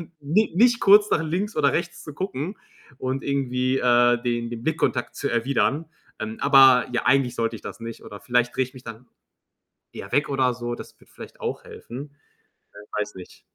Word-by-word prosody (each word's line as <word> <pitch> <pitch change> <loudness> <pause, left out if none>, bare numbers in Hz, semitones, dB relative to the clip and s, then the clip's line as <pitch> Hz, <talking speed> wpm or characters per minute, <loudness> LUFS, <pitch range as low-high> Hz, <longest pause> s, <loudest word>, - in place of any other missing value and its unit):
dann 170 0 -11
ni 175 +10 +1
nicht 235 +4 +4
kurz 205 +1 +6
nach 160 - +2
links 185 +7 -2
oder 145 -2 +3
rechts 175 +1 -3
zu 150 - -9
gucken 185 +2 -4 0.4
und 130 +1 -3
irgendwie, 130 -1 0
äh, 120 -1 +3
den 120 -1 -1
den 120 -1 -7
Blickkontakt 140 -5 -1
zu - - -2
erwidern. 135 +5 0 0.3
Ähm, 110 0 -5
aber 135 -3 +6
ja, 120 - -1
eigentlich 135 -2 +3
sollte 115 0 -2
ich - - -15
das - - -8
nicht 115 0 -8
oder 100 - -10
vielleicht 125 +1 0
drehe 130 - +2
ich 130 +2 -14
mich 125 - -13
dann 115 +2 -10 0.8
eher - - -9
weg 145 +3 +2
oder 130 -2 +2
so. 120 0 -4
Das - - -11
würde - - -23
vielleicht - - -12
auch - - -4
helfen. 140 +4 -10 0.6
Äh, 105 +1 -6
weiß 105 - -4
nicht. 90 -1 -13
130 Hz, 195 wpm, -24 LUFS, 120-150 Hz, 0.8 s, kurz